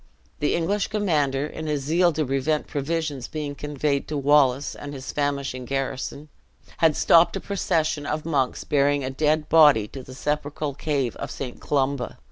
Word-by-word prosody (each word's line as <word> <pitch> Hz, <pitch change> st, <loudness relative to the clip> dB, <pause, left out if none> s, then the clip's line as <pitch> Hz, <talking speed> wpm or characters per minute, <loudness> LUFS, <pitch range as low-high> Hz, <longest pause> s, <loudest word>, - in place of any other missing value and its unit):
The 150 Hz, -, +1 dB
English 195 Hz, +4 st, 0 dB
commander, 150 Hz, -10 st, 0 dB
in 155 Hz, +1 st, -6 dB
his 150 Hz, -2 st, -1 dB
zeal 170 Hz, +5 st, +3 dB
to 155 Hz, 0 st, 0 dB
prevent 135 Hz, +3 st, 0 dB
provisions 145 Hz, -2 st, -3 dB
being 150 Hz, -2 st, -4 dB
conveyed 145 Hz, 0 st, -2 dB
to 150 Hz, -, -3 dB
Wallace 140 Hz, -1 st, +3 dB
and 145 Hz, 0 st, -8 dB
his 130 Hz, 0 st, -6 dB
famishing 140 Hz, -3 st, -2 dB
garrison, 135 Hz, +2 st, -3 dB, 0.5 s
had 160 Hz, -3 st, +3 dB
stopped 170 Hz, +2 st, +5 dB
a -, -, -1 dB
procession 160 Hz, -7 st, -1 dB
of 150 Hz, +1 st, -2 dB
monks 140 Hz, -6 st, 0 dB
bearing 145 Hz, 0 st, +2 dB
a 130 Hz, -, -3 dB
dead 150 Hz, +2 st, +1 dB
body 145 Hz, -9 st, +6 dB
to 135 Hz, -, -8 dB
the 130 Hz, 0 st, -11 dB
sepulchral 150 Hz, +1 st, -2 dB
cave 140 Hz, -3 st, -1 dB
of -, -, -5 dB
St. 125 Hz, -3 st, -6 dB
Columba. 135 Hz, -3 st, -1 dB
145 Hz, 165 wpm, -24 LUFS, 135-155 Hz, 0.5 s, body